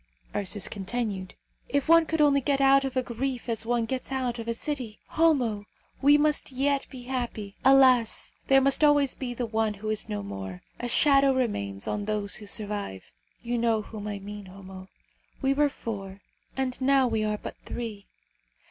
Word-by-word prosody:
Ursus 200 0 -1
continued, 195 -2 -4 0.3
"If 285 +1 0
one 330 0 +6
could 320 -1 0
only 280 -2 +4
get 275 +1 +1
out 275 0 +5
of 265 -1 -3
a 255 - +2
grief 250 +1 -4
as 225 -1 -1
one 240 -1 +1
gets 260 +3 -4
out 250 -3 -2
of 230 - -6
a 230 - 0
city! 250 -6 -4
Homo, 250 -11 +2 0.4
we 290 +2 +6
must 300 -1 +1
yet 275 +1 0
be 255 -3 -9
happy. 240 -6 -4
Alas! 260 -4 +5
there 270 0 +6
must 275 +3 +4
always 290 -2 +4
be 245 -2 -5
the 245 - -2
one 220 -1 -1
who 215 +2 -4
is 215 - -1
no 105 -1 -3
more. 95 -2 -7 0.2
A 245 - -3
shadow 275 +1 +4
remains 100 - -2
on 205 -1 -2
those 210 -1 -1
who 210 - -11
survive. 200 - -3 0.3
You 240 0 -1
know 225 -2 +1
whom 210 0 -8
I 205 -1 -3
mean, 205 0 -9
Homo. 190 0 -11 0.5
We 270 -1 +2
were 290 +1 +3
four, 200 -6 -7 0.4
and 260 -1 -2
now 270 0 +4
we 220 -2 0
are 210 0 -1
but - - -8
three. 220 -4 -6
235 Hz, 185 wpm, -27 LUFS, 205-270 Hz, 0.5 s, one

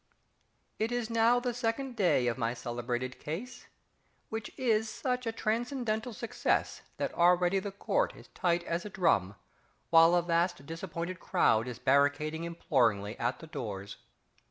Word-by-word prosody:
_ - - -44 0.8
It 220 +2 0
is 240 -2 -2
now 230 +2 +4
the 245 0 -2
second 245 +2 -2
day 180 - +3
of 120 -1 +1
my 120 -1 -1
celebrated 120 +1 -4
case, 245 +12 -6 0.6
which 220 -1 -4
is 225 -4 +1
such 250 +1 -2
a - - +1
transcendental 230 +1 -1
success 230 +1 -1 0.2
that - - -2
already 180 +2 +4
the 200 +1 -5
Court - - 0
is - - -14
tight 175 -1 0
as 170 0 -2
a 210 - -6
drum, 100 - +1 0.6
while 165 +1 +7
a 175 - +3
vast 170 -3 0
disappointed 170 +2 -5
crowd 125 - +2
is 125 -3 -5
barricading 145 +5 +2
imploringly 115 -11 +1
at 120 +2 0
the - - -11
doors! 105 -10 -6
175 Hz, 155 wpm, -31 LUFS, -, 0.8 s, while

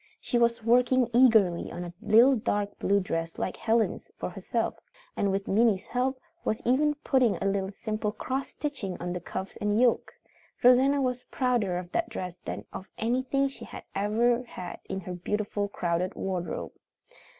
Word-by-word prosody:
She 240 - 0
was 235 -1 +2
working 245 +1 +3
eagerly 220 -8 +4
on 175 - -5
a 175 0 -7
little 230 +5 +6
dark 205 -3 -2
blue 200 +1 +3
dress 165 -3 -3
like 185 - -2
Helen's 225 0 0
for - - -4
herself, - - -2 0.4
and 200 - +1
with 195 0 -2
Minnie's 210 -1 +3
help 255 +1 -1 0.2
was 220 - 0
even 295 +5 +3
putting 255 -6 +3
a - - -4
little 195 -1 0
simple 215 +1 -3
cross 260 +5 -3
stitching 270 -11 -4
on 175 +1 -3
the 180 - -3
cuffs 190 +2 -6
and 210 +1 +1
yoke. 245 -1 +3 0.5
Rosanna 265 +3 +5
was 250 -1 -2
prouder 240 -8 0
of 180 0 -6
that 340 - 0
dress 180 -2 -5
than - - -5
of 190 - -7
anything 260 +4 +1
she 270 - -9
had - - -9
ever 230 +4 +2
had 185 -7 -8
in 190 0 -3
her 180 0 -6
beautiful, 205 +3 -2
crowded 180 -2 -1
wardrobe. 185 -2 -3
215 Hz, 170 wpm, -28 LUFS, 190-250 Hz, 0.5 s, little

